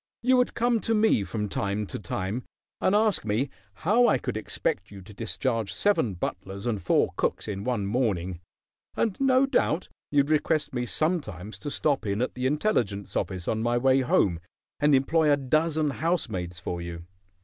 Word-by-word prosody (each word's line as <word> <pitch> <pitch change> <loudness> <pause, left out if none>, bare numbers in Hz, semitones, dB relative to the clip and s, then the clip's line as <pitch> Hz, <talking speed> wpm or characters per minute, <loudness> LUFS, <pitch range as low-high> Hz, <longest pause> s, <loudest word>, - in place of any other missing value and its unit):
You 255 +2 +5
would 250 - +1
come 240 0 +2
to 225 +1 0
me 210 - +3
from 105 +2 -3
time 100 +1 -2
to - - -6
time 100 +5 -3 0.4
and 190 - +2
ask 215 -1 +3
me 110 +6 0 0.3
how 235 +7 +5
I - - +4
could - - -4
expect - - -2
you 100 - -10
to 105 +3 -13
discharge 115 0 -2
seven 125 - +1
butlers 95 +3 -5
and 110 -5 -1
four - - +2
cooks - - -1
in 100 -1 -4
one 120 -4 -1
morning, 95 -6 -1 0.5
and 215 -5 0
no 265 0 +5
doubt 185 -10 0 0.2
you'd 145 +1 +2
request 155 -1 +1
me 125 -1 -2
sometimes 130 - -2
to 145 - -5
stop 140 -5 0
in 100 +1 -1
at 125 - -1
the 125 +1 -1
intelligence 125 - 0
office 95 -3 -2
on 110 - 0
my 120 +1 +1
way 130 +2 +4
home 95 -8 +2 0.4
and 150 -1 +5
employ 150 +3 +3
a 145 - +4
dozen 155 +2 +1
housemaids 110 - -2
for 85 0 -4
you." 85 -1 -7
125 Hz, 180 wpm, -27 LUFS, 100-160 Hz, 0.5 s, You